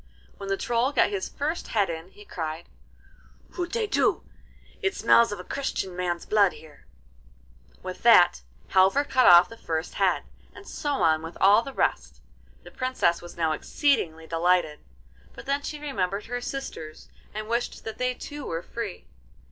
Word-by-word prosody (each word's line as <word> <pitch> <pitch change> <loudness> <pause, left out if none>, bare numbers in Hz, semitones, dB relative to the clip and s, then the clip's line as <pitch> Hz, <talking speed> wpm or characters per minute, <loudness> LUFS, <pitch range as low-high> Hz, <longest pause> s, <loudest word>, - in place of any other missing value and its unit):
When 200 -1 -7
the 195 - 0
Troll 240 +5 0
got 285 - +2
his 195 -2 -3
first 310 +4 -3
head 205 -3 +1
in 165 +1 -6
he 210 +2 -16
cried: 160 -2 -5 0.8
'Hutetu! 420 +5 0 0.6
It 395 -1 0
smells 235 -1 +4
of 205 - -5
a - - -7
Christian 195 -7 -3
man's 175 -1 -2
blood 205 -3 +3
here!' 155 - -16 1.0
With - - -7
that - - +6 0.3
Halvor 190 +9 +4
cut 260 -3 +3
off 175 0 +9
the 230 - -12
first 160 -5 -3
head, - - +1 0.3
and - - -13
so 295 - -4
on 160 -1 +3
with 165 +1 -8
all 200 +3 +6
the 275 - -7
rest. - - -1 0.4
The - - -13
Princess 255 -10 0
was 175 0 -11
now 160 -2 +1
exceedingly 160 - 0
delighted, 165 -2 +1 0.6
but - - -10
then 280 +1 0
she 300 - -5
remembered 205 -9 -3
her 245 +1 -4
sisters, 240 - -7 0.2
and 215 0 -6
wished 235 +1 -2
that 220 -1 -7
they 250 0 0
too 290 +2 -8
were 165 -5 -4
free. 225 -6 -6
200 Hz, 165 wpm, -26 LUFS, 170-255 Hz, 1.0 s, off